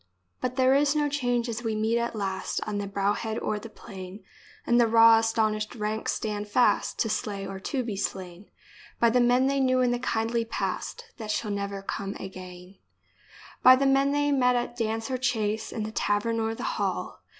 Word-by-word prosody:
But 255 Hz, 0 st, -3 dB
there 260 Hz, 0 st, +4 dB
is 285 Hz, +1 st, +3 dB
no 295 Hz, -1 st, +2 dB
change 245 Hz, -4 st, 0 dB
as 230 Hz, 0 st, -4 dB
we 225 Hz, -2 st, -2 dB
meet 220 Hz, +2 st, +1 dB
at 235 Hz, 0 st, -2 dB
last 190 Hz, -2 st, -2 dB
On 205 Hz, -1 st, -3 dB
the 200 Hz, -, -3 dB
brow 200 Hz, +1 st, 0 dB
head 220 Hz, +1 st, -4 dB
or 210 Hz, -, -2 dB
the 230 Hz, -, -10 dB
plain, 190 Hz, -2 st, -10 dB, 0.4 s
And 240 Hz, 0 st, +4 dB
the 235 Hz, -, +4 dB
raw 225 Hz, 0 st, +7 dB
astonished 220 Hz, -1 st, 0 dB
ranks 215 Hz, 0 st, -2 dB
stand 210 Hz, -1 st, -3 dB
fast 245 Hz, +4 st, +2 dB
To -, -, +1 dB
slay 210 Hz, -2 st, -3 dB
or 195 Hz, 0 st, -6 dB
to 255 Hz, +6 st, -2 dB
be 225 Hz, -4 st, -4 dB
slain 190 Hz, -1 st, -5 dB, 0.5 s
By 235 Hz, -1 st, +4 dB
the 250 Hz, -, +3 dB
men 245 Hz, +2 st, +4 dB
they 275 Hz, +1 st, +1 dB
knew 255 Hz, -1 st, +2 dB
in 250 Hz, -1 st, +2 dB
the 245 Hz, -, -1 dB
kindly 230 Hz, -1 st, 0 dB
past 470 Hz, -, -4 dB
That 220 Hz, -2 st, -7 dB
shall 210 Hz, 0 st, -1 dB
never 200 Hz, -1 st, -4 dB
come 195 Hz, 0 st, -4 dB
again 185 Hz, 0 st, -10 dB, 0.4 s
— -, -, -21 dB
By 255 Hz, 0 st, +9 dB
the 275 Hz, +2 st, 0 dB
men 275 Hz, +1 st, +3 dB
they 290 Hz, 0 st, +1 dB
met 250 Hz, -3 st, +3 dB
at 240 Hz, 0 st, -2 dB
dance 225 Hz, +1 st, -2 dB
or 255 Hz, -, -1 dB
chase, 220 Hz, -3 st, -1 dB
In 220 Hz, -, -3 dB
the 215 Hz, -, -4 dB
tavern 220 Hz, +2 st, 0 dB
or 225 Hz, 0 st, -1 dB
the -, -, -7 dB, 0.2 s
hall. -, -, -3 dB
225 Hz, 205 wpm, -27 LUFS, 205-245 Hz, 0.5 s, By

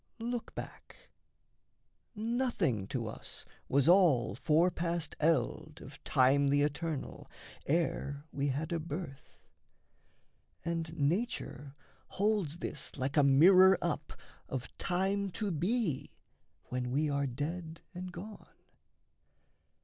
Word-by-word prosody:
Look 235 Hz, 0 st, -4 dB
back: -, -, -10 dB, 1.0 s
Nothing 220 Hz, -, 0 dB
to 120 Hz, 0 st, -3 dB
us 110 Hz, -, -7 dB, 0.2 s
was 140 Hz, +2 st, +3 dB
all 165 Hz, -, +5 dB
fore 155 Hz, -, +3 dB
passed 170 Hz, -1 st, -2 dB
eld 155 Hz, -1 st, 0 dB
Of 135 Hz, +1 st, -12 dB
time 140 Hz, +1 st, +4 dB
the 145 Hz, +1 st, +3 dB
eternal, 150 Hz, 0 st, -3 dB, 0.4 s
ere 145 Hz, -2 st, -1 dB
we 140 Hz, 0 st, -1 dB
had 145 Hz, +5 st, -2 dB
a 170 Hz, -, 0 dB
birth. 155 Hz, -3 st, -7 dB, 1.2 s
And 165 Hz, -1 st, -2 dB
Nature 145 Hz, -, -2 dB, 0.3 s
holds 200 Hz, -6 st, 0 dB
this 150 Hz, -5 st, -5 dB
like 135 Hz, +1 st, -2 dB
a 150 Hz, -, +6 dB
mirror 185 Hz, +7 st, +7 dB
up -, -, -3 dB, 0.4 s
Of 130 Hz, -2 st, -5 dB
time 195 Hz, +2 st, 0 dB
to 210 Hz, -3 st, -2 dB
be 170 Hz, -, 0 dB, 0.6 s
when 125 Hz, -1 st, -2 dB
we 145 Hz, +5 st, +1 dB
are 140 Hz, -1 st, 0 dB
dead 160 Hz, +6 st, -5 dB
and 180 Hz, 0 st, -6 dB
gone. 200 Hz, +5 st, -10 dB
160 Hz, 110 wpm, -32 LUFS, 140-185 Hz, 1.2 s, mirror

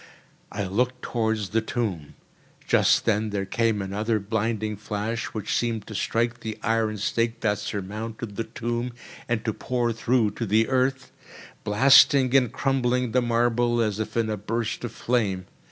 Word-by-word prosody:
I 105 Hz, -, -3 dB
looked 125 Hz, +7 st, -1 dB
towards 110 Hz, -4 st, -1 dB
the 115 Hz, +1 st, +1 dB
tomb. 110 Hz, -, -3 dB, 0.5 s
Just -, -, +4 dB
then 110 Hz, -1 st, +1 dB
there 100 Hz, -1 st, -2 dB
came 110 Hz, 0 st, 0 dB
another 105 Hz, +4 st, -1 dB
blinding 110 Hz, +1 st, -2 dB
flash, 105 Hz, +2 st, -3 dB
which 110 Hz, -3 st, -3 dB
seemed 115 Hz, -3 st, -1 dB
to 110 Hz, -, -9 dB
strike 115 Hz, +3 st, 0 dB
the 110 Hz, -2 st, -5 dB
iron 110 Hz, -1 st, +1 dB
stake 115 Hz, +2 st, -1 dB
that 105 Hz, -2 st, +1 dB
surmounted 105 Hz, +2 st, -5 dB
the 115 Hz, -, -2 dB
tomb 120 Hz, +1 st, -3 dB, 0.4 s
and 115 Hz, -2 st, -1 dB
to 110 Hz, -, 0 dB
pour 120 Hz, 0 st, -1 dB
through 115 Hz, -1 st, +1 dB
to 115 Hz, +2 st, -4 dB
the 110 Hz, +3 st, +3 dB
earth, 130 Hz, 0 st, 0 dB, 0.5 s
blasting 135 Hz, +4 st, +6 dB
and 125 Hz, -4 st, +4 dB
crumbling 125 Hz, -3 st, 0 dB
the 125 Hz, -, +3 dB
marble, 120 Hz, 0 st, +1 dB
as 110 Hz, -2 st, 0 dB, 0.2 s
in 110 Hz, -2 st, +1 dB
a 105 Hz, -, -2 dB
burst 110 Hz, +3 st, -3 dB
of 120 Hz, -, -4 dB
flame. 100 Hz, -7 st, -1 dB
115 Hz, 155 wpm, -25 LUFS, 105-120 Hz, 0.5 s, blasting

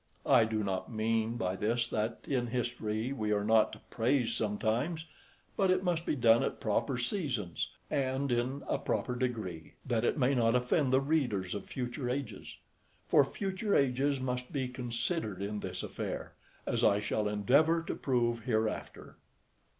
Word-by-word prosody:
I 125 Hz, -5 st, +6 dB
do 110 Hz, -1 st, -1 dB
not 95 Hz, +3 st, -2 dB
mean 115 Hz, +1 st, 0 dB
by 95 Hz, -4 st, -1 dB
this, 115 Hz, +4 st, 0 dB
that 110 Hz, +2 st, -2 dB
in 125 Hz, -3 st, -1 dB
history 120 Hz, 0 st, -2 dB
we 110 Hz, -5 st, -2 dB
are 105 Hz, -1 st, +2 dB
not 110 Hz, 0 st, +4 dB
to -, -, -8 dB
praise 120 Hz, 0 st, +1 dB
sometimes, 115 Hz, +10 st, -1 dB, 0.5 s
but 195 Hz, -2 st, +2 dB
it 185 Hz, 0 st, +3 dB
must 170 Hz, -2 st, 0 dB
be -, -, +1 dB
done 115 Hz, -3 st, +5 dB
at -, -, -2 dB
proper 120 Hz, +5 st, 0 dB
seasons, 120 Hz, -, -2 dB, 0.2 s
and 135 Hz, 0 st, 0 dB
in 125 Hz, +4 st, 0 dB
a -, -, 0 dB
proper 125 Hz, -, -1 dB
degree, 110 Hz, -11 st, -3 dB
that 120 Hz, -3 st, 0 dB
it -, -, +1 dB
may 135 Hz, 0 st, +3 dB
not 115 Hz, -2 st, +3 dB
offend 125 Hz, +2 st, +2 dB
the 130 Hz, -, +5 dB
readers 125 Hz, -, 0 dB
of 100 Hz, -, -5 dB
future 125 Hz, 0 st, -3 dB
ages; 135 Hz, +2 st, -4 dB, 0.5 s
for 145 Hz, -, +5 dB
future 195 Hz, +7 st, -2 dB
ages 140 Hz, +1 st, +2 dB
must 125 Hz, -1 st, -3 dB
be 135 Hz, -3 st, -1 dB
considered 125 Hz, -, -3 dB
in 105 Hz, +1 st, -3 dB
this 90 Hz, -2 st, -5 dB
affair, -, -, -5 dB, 0.3 s
as -, -, 0 dB
I 100 Hz, -, +5 dB
shall 105 Hz, 0 st, -1 dB
endeavour 140 Hz, +11 st, +3 dB
to -, -, -3 dB
prove 120 Hz, -3 st, 0 dB
hereafter. 110 Hz, -3 st, -2 dB
120 Hz, 165 wpm, -32 LUFS, 110-135 Hz, 0.5 s, I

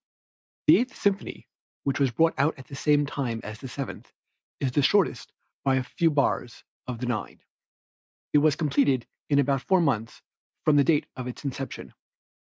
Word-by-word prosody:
The -, -, +8 dB
Eighth 255 Hz, +2 st, -2 dB
Symphony 200 Hz, -1 st, -2 dB, 0.4 s
which 140 Hz, 0 st, -1 dB
was 135 Hz, -2 st, +3 dB
brought 165 Hz, +8 st, +2 dB
out 145 Hz, +2 st, +2 dB
at 135 Hz, -, -11 dB
the 140 Hz, -, -10 dB
same 145 Hz, +1 st, +3 dB
time 130 Hz, -5 st, -3 dB
as 105 Hz, 0 st, -7 dB
the 135 Hz, -, -7 dB
Seventh 135 Hz, +2 st, -7 dB, 0.5 s
is 135 Hz, -2 st, 0 dB
the 145 Hz, -, +2 dB
shortest 200 Hz, +6 st, +2 dB, 0.3 s
by 135 Hz, -1 st, +3 dB
a 130 Hz, -, +1 dB
few 165 Hz, +6 st, +1 dB
bars, 140 Hz, -4 st, 0 dB, 0.2 s
of 125 Hz, -2 st, -4 dB
the 125 Hz, -, -4 dB
nine. 120 Hz, -3 st, -4 dB, 0.9 s
It 150 Hz, -, +6 dB
was 150 Hz, 0 st, +3 dB
completed 140 Hz, -5 st, +1 dB, 0.2 s
in 145 Hz, -, +3 dB
about 140 Hz, -1 st, +2 dB
four 190 Hz, +4 st, +3 dB
months 120 Hz, -9 st, -1 dB, 0.4 s
from 150 Hz, -1 st, +5 dB
the 140 Hz, -, +6 dB
date 150 Hz, 0 st, +2 dB
of 130 Hz, -1 st, -5 dB
its 125 Hz, +4 st, -8 dB
inception. 135 Hz, 0 st, -5 dB
140 Hz, 180 wpm, -26 LUFS, 125-150 Hz, 0.9 s, The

